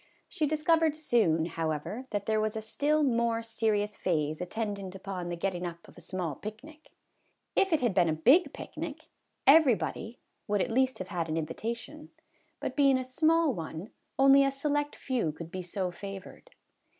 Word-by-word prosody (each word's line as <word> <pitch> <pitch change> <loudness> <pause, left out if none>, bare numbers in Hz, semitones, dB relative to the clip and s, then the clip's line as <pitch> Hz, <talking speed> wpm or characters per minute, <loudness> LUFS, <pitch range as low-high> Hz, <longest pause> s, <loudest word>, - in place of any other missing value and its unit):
She 305 - -1
discovered 310 +1 +2
soon, 215 - +2
however, 165 - -3
that 205 -2 -2
there 215 -1 +1
was 215 +1 -1
a 220 - -2
still 300 +7 +1
more 235 -3 +1
serious 220 -2 0
phase 155 -3 -1
attendant 200 0 -4
upon 190 -2 -5
the 175 - -2
getting 180 0 -2
up 170 -1 -6
of - - -16
a - - -13
small 175 -2 -3
picnic. 250 - -10 0.7
If 390 - +3
it 320 - +3
had 240 -5 +2
been 175 -2 +3
a - - +2
big 275 - +5
picnic, - - -7 0.4
everybody 260 -5 +4 0.3
would 205 -1 +1
at 195 - 0
least 260 +2 +2
have 185 0 -6
had 170 -4 -2
an 155 - -1
invi 160 -1 -2
tation; 235 +7 -5 0.5
but 260 - -4
being 275 -2 +5
a 260 - -2
small 315 +3 +2
one, 165 +2 -6 0.3
only 275 +1 +7
a 275 - +3
select 290 +1 -1
few 245 - -1
could 165 +2 -9
be 185 - -4
so 180 +1 -3
favored. 195 +1 -9
220 Hz, 175 wpm, -30 LUFS, 180-275 Hz, 0.7 s, only